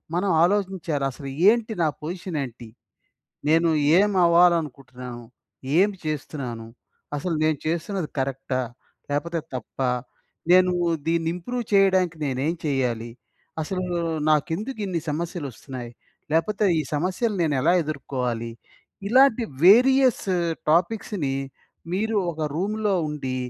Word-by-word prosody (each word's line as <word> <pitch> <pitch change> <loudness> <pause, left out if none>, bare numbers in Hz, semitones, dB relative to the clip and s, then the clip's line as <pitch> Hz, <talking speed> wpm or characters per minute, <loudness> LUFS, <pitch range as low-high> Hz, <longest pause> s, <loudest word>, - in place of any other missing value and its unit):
మనం 190 +2 +1
ఆలోచించాలి. 185 -7 0
అసలు 135 +1 -8 0.2
ఏంటి 230 -1 +1
నా - - +3 0.2
పొజిషన్ 175 0 -4
ఏంటి? 120 -2 -9 0.8
నేను 165 +2 +4 0.3
ఏమి 205 -1 +3
అవ్వాలనుకుంటున్నాను? 140 -8 +1 0.5
ఏం 200 +2 +5 0.2
చేస్తున్నాను? 135 -6 -4 0.5
అసలు 165 +3 -2
నేను 155 -2 +1
చేస్తున్నది 170 +1 -2
కరెక్టా? 130 -1 -2 0.5
లేకపోతే 165 +3 -1
తప్పా? 125 +1 -2 0.6
నేను 180 0 +6 0.3
దీన్ని 165 0 +1
ఇంప్రూవ్ 240 +7 -4
చేయడానికి 190 -4 +4
నేనేం 135 +5 -1
చేయాలి? 125 -5 -1 0.5
అసలు 185 +3 -3 0.5
నాకెందుకు 180 - 0
ఇన్ని 175 -3 -2
సమస్యలు 165 0 -3
వస్తున్నాయి. 125 -1 -8 0.4
లేకపోతే 205 +6 +1 0.2
ఈ - - -1
సమస్యలు 185 +8 0
నేను 150 -3 +1
ఎలా 170 +4 +4
ఎదుర్కోవాలి? 125 -6 -3 0.6
ఇలాంటి 255 -1 +5 0.2
వేరియస్ 255 +5 +6 0.5
టాపిక్స్‌ని 175 -5 0 0.6
మీరు 220 +2 0 0.2
ఒక 160 - -9
రూమ్‌లో 210 +3 0
ఉండి, 135 -4 -4
165 Hz, 105 wpm, -24 LUFS, 140-195 Hz, 0.8 s, నేను